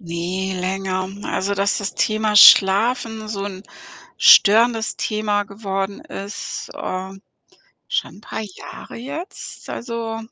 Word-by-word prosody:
Ne, 180 Hz, +2 st, -3 dB
länger. 185 Hz, 0 st, -2 dB, 0.2 s
Also, 200 Hz, +1 st, -1 dB
dass 200 Hz, +1 st, 0 dB
das 200 Hz, -1 st, -4 dB
Thema 215 Hz, -1 st, +1 dB
Schlafen 220 Hz, +3 st, +6 dB
so 200 Hz, -2 st, -4 dB
'n 195 Hz, -1 st, -7 dB, 0.6 s
störendes 225 Hz, +2 st, +5 dB
Thema 210 Hz, -1 st, -1 dB
geworden 200 Hz, -1 st, -4 dB
ist, 200 Hz, +1 st, -7 dB
ähm, 190 Hz, +1 st, -6 dB, 0.7 s
schon -, -, -2 dB
'n 205 Hz, -, -15 dB
paar 220 Hz, -, -6 dB
Jahre 205 Hz, -4 st, -10 dB
jetzt, 285 Hz, +10 st, -8 dB
also 230 Hz, -2 st, -5 dB
200 Hz, 115 wpm, -20 LUFS, 190-220 Hz, 0.7 s, Schlafen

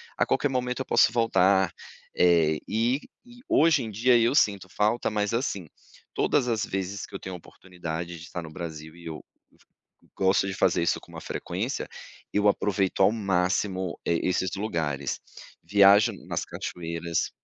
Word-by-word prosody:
a -, -, +2 dB
qualquer 145 Hz, -, +1 dB
momento 125 Hz, 0 st, -2 dB
eu -, -, -3 dB
posso -, -, +4 dB
voltar". 95 Hz, -5 st, +3 dB, 0.4 s
Eh, 80 Hz, -3 st, +4 dB
e 115 Hz, +6 st, +1 dB, 0.3 s
e 245 Hz, 0 st, -15 dB
hoje 155 Hz, -3 st, +4 dB
em 110 Hz, -, -5 dB
dia, 120 Hz, +4 st, +3 dB
eu 120 Hz, +4 st, +2 dB
sinto 100 Hz, -, +2 dB
falta, 110 Hz, +5 st, +1 dB
mas 105 Hz, 0 st, -1 dB
assim, 100 Hz, -, -2 dB, 0.5 s
todas 135 Hz, -4 st, +1 dB
as 110 Hz, -2 st, 0 dB
vezes 95 Hz, +1 st, -4 dB
que -, -, -12 dB
eu -, -, -4 dB
tenho 95 Hz, -, -7 dB
a -, -, -6 dB
oportunidade 85 Hz, -1 st, -7 dB
de 85 Hz, -, -12 dB
tá 90 Hz, -, -4 dB
no 80 Hz, -1 st, -9 dB
Brasil, 80 Hz, -2 st, -7 dB
e 85 Hz, -1 st, -14 dB
eu 80 Hz, -, -6 dB, 0.3 s
go -, -, -28 dB, 0.7 s
gosto 95 Hz, +1 st, +3 dB
de 95 Hz, -, -3 dB
fazer 85 Hz, -, +2 dB
isso 85 Hz, -, +1 dB
com -, -, -17 dB
uma -, -, -8 dB
frequência, -, -, -4 dB, 0.4 s
eu 105 Hz, 0 st, +2 dB
aproveito 100 Hz, -1 st, +1 dB
ao 95 Hz, -, +6 dB
máximo, 95 Hz, -2 st, -1 dB
eh, 85 Hz, -, +2 dB
esses 90 Hz, 0 st, 0 dB
lugares. 80 Hz, -9 st, -2 dB, 0.4 s
Viajo 100 Hz, +5 st, +6 dB, 0.2 s
nas -, -, -2 dB
cachoeiras 85 Hz, -1 st, -3 dB
95 Hz, 170 wpm, -26 LUFS, 85-110 Hz, 0.7 s, ao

